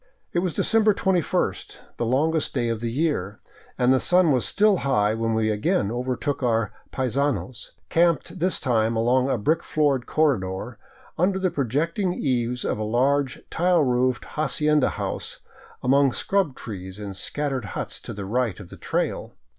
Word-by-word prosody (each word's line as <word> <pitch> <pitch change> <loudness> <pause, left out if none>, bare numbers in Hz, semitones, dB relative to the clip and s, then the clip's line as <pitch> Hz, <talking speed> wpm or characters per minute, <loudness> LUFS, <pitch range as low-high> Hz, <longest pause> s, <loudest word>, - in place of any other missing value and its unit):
It 175 - +2
was 175 -2 -1
December 220 -2 +3
21, 180 -4 +1 0.4
the 120 - -1
longest 155 +6 +1
day 120 -3 0
of 115 -1 -2
the 115 +1 -2
year, 115 - -1 0.4
arid 125 0 +4
the 130 - +3
sun 180 0 +4
was 125 -3 +2
still 210 -1 +3
high 110 -9 +1
when 115 0 -1
we 110 -1 +1
again 105 -1 0
overtook 130 +4 -2
our 115 -3 +1
" - - -36
paisanos," 130 -5 -2 0.2
camped 170 +1 +1
this 185 +2 +1
time 115 -3 +1
along 125 +4 +2
a 130 - +1
brick 155 +10 +1
floored 145 -7 0
corredor 110 -7 0 0.4
under 190 +2 +2
the 185 -2 0
projecting 165 - -1
eaves 125 -2 -1
of - - -1
a - - -1
large 130 +5 +1
tile 175 -1 +3
roofed 125 -1 +1
hacienda 150 -1 +1
house, - - -5 0.5
among 135 0 +4
scrub 190 -9 0
trees 95 -3 -8
and 100 -2 -7
scattered 135 +3 -2
huts - - -3
to - - -8
the 100 -1 -6
right 115 -2 -1
of 95 -4 -11
the - - -10
trail. - - -2
130 Hz, 165 wpm, -24 LUFS, 115-155 Hz, 0.5 s, arid